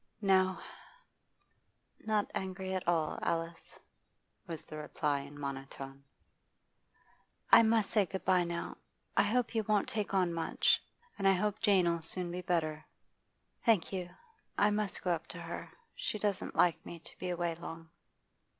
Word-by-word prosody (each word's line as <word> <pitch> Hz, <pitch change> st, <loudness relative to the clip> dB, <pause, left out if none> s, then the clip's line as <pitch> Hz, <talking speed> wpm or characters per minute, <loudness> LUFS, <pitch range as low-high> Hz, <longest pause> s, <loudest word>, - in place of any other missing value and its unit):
'Not 190 Hz, -2 st, +3 dB, 1.8 s
angry 190 Hz, 0 st, -3 dB
at 185 Hz, -2 st, -3 dB
all, 165 Hz, -3 st, +1 dB
Alice,' 165 Hz, 0 st, -3 dB, 0.7 s
was 165 Hz, -3 st, -4 dB
the 155 Hz, -, -10 dB
reply 150 Hz, -1 st, -1 dB
in 140 Hz, +1 st, -9 dB
a -, -, -10 dB
monotone. 135 Hz, 0 st, -6 dB, 1.5 s
'I -, -, +10 dB
must 225 Hz, -2 st, +3 dB
say 205 Hz, -4 st, +3 dB
good 190 Hz, +1 st, -5 dB
bye 185 Hz, -1 st, +4 dB
now. 170 Hz, 0 st, -4 dB, 0.4 s
I -, -, +6 dB
hope 240 Hz, +4 st, +1 dB
you 225 Hz, -, +2 dB
won 210 Hz, -1 st, +2 dB
t -, -, -9 dB
take 205 Hz, -2 st, -1 dB
on 180 Hz, -3 st, +3 dB
much. 165 Hz, -1 st, +2 dB, 0.4 s
And 195 Hz, -, +3 dB
I 195 Hz, -, +7 dB
hope 210 Hz, +2 st, 0 dB
Jane 195 Hz, -5 st, +4 dB
'll 170 Hz, -1 st, +1 dB
soon 175 Hz, +2 st, -4 dB
be 180 Hz, +1 st, -3 dB
better.' 160 Hz, -4 st, 0 dB, 0.8 s
'Thank 215 Hz, -6 st, +3 dB
you. 180 Hz, -2 st, -3 dB, 0.5 s
I 205 Hz, +1 st, +4 dB
must 210 Hz, -2 st, -1 dB
go 180 Hz, -, +1 dB
up 165 Hz, -1 st, -1 dB
to 175 Hz, -, -5 dB
her; 170 Hz, 0 st, -6 dB, 0.2 s
she -, -, -2 dB
doesn't 205 Hz, -2 st, -1 dB
like 175 Hz, -2 st, +3 dB
me 170 Hz, -, -8 dB
to 165 Hz, -, -15 dB
be 180 Hz, -, -3 dB
away 175 Hz, -1 st, 0 dB
long. 165 Hz, -1 st, -9 dB
180 Hz, 160 wpm, -33 LUFS, 165-195 Hz, 1.8 s, I